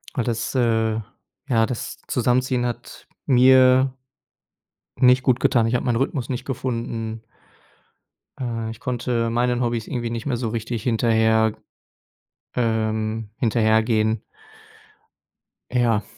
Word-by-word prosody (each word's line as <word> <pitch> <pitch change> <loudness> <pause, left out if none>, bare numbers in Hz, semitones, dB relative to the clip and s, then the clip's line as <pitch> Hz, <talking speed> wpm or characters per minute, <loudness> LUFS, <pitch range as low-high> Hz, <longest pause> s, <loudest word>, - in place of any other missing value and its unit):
Weil 125 - 0
das, 115 -1 -2
äh, 115 -3 +2 0.6
ja, 115 -3 +3
das 125 +1 -5
Zusammenziehen 125 0 +1
hat 120 -1 -6 0.2
mir 130 0 +5 1.0
nicht 125 0 +5
gut 130 -2 +2
getan. 115 -2 +3
Ich 115 - 0
habe 125 - -1
meinen 120 -3 +1
Rhythmus 130 -1 -2
nicht 125 -2 -4
gefunden. 115 -3 -4 1.2
Äh, 115 -3 -3
ich 115 - -11
konnte 120 -2 -1
meinen 120 +1 0
Hobbys 120 -2 -1
irgendwie 120 -4 -3
nicht 115 0 -5
mehr 125 -4 -1
so 115 -2 -2
richtig 115 0 -4
hinterher 110 -2 +2 1.0
ähm, 110 -2 -1
hinterhergehen. 110 -1 +2 1.5
Ja. 115 -4 +2
115 Hz, 115 wpm, -22 LUFS, 110-125 Hz, 1.5 s, mir